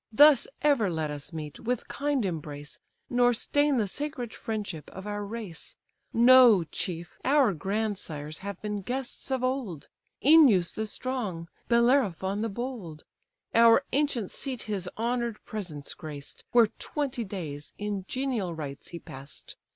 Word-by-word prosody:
Thus 290 +3 +7 0.2
ever 275 -9 +4
let 160 -3 -2
us 145 +2 -5
meet, 155 -3 -6
with 245 0 -2
kind 285 -5 0
embrace, 150 -4 -5 0.3
Nor 245 0 +4
stain 290 +4 +2
the 215 -3 +1
sacred 260 0 -3
friendship 205 -8 -5
of 190 - -9
our 205 0 -3
race. 205 -6 -6 0.4
Know, 240 -5 +7
chief, 170 +2 -5
our 270 -6 +4
grandsires 175 -5 -3
have 200 -1 -6
been 210 -1 -2
guests 255 +6 -4
of 260 -1 0
old; 255 - -2 0.4
Œneus 265 - +7
the 220 0 -3
strong, 210 -9 -4 0.2
Bellerophon 235 - +3
the 225 - -1
bold: 205 -9 -6 0.5
Our 230 +3 +7
ancient 275 -7 +1
seat 260 -4 -5
his 195 -4 -3
honour'd 235 0 -1
presence 175 -10 -6
graced, 145 -3 -9
Where 235 -3 +6
twenty 275 -5 -2
days 160 -8 -6
in 205 -2 -3
genial 245 -10 -2
rites 145 -3 -6
he 170 - -7
pass'd. 140 -2 -9
210 Hz, 140 wpm, -28 LUFS, 170-250 Hz, 0.5 s, Thus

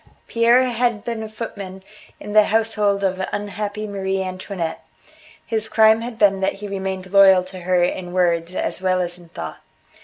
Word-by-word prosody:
Pierre 235 +2 +4
had 240 -3 0
been 230 -2 -4
a 220 - -6
footman 200 -4 -7 0.4
in 205 - -7
the 215 -1 +6
household 210 -2 +1
of 190 -1 0
unhappy 205 +1 -4
Marie 195 -2 -2
Antoinette. 185 -3 -5 0.6
His 220 -1 -1
crime 220 0 +5
had 235 -1 -6
been 200 -3 +4
that 190 - 0
he 205 +1 -8
remained 190 -1 -5
loyal 190 -2 +7
to 185 0 -9
her 180 0 +1
in 175 0 -2
words 175 -1 +1
as - - -1
well 185 -1 +1
as 175 0 -3
in 170 -1 -17
thought. 80 - -7
195 Hz, 175 wpm, -21 LUFS, 185-215 Hz, 0.6 s, loyal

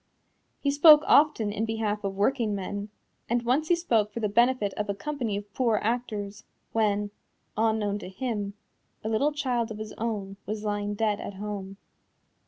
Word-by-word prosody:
He 280 - +1
spoke 300 +1 +8
often 285 -8 +4
in 215 +1 -2
behalf 220 -2 -1
of 195 -1 -2
workingmen, 205 -3 -1 0.4
and 240 +1 +1
once 265 +6 +1
he 350 - +4
spoke 225 -11 +1
for 230 - -5
the 215 - +1
benefit 235 -1 +2
of 210 -1 -3
a 200 - 0
company 240 -2 -3
of 205 0 -9
poor 230 -4 +2
actors, 210 -3 -2 0.3
when, 210 -2 +1 0.4
unknown 215 -2 +1
to 195 - -8
him, 205 -1 -3 0.5
a 220 - -2
little 250 +7 +2
child 250 -6 -1
of 220 - -6
his 215 0 -7
own 205 -4 -3
was 215 +1 -4
lying 205 -1 -2
dead 210 -1 0
at 200 - -6
home. 195 -1 -6
215 Hz, 170 wpm, -27 LUFS, 205-240 Hz, 0.5 s, spoke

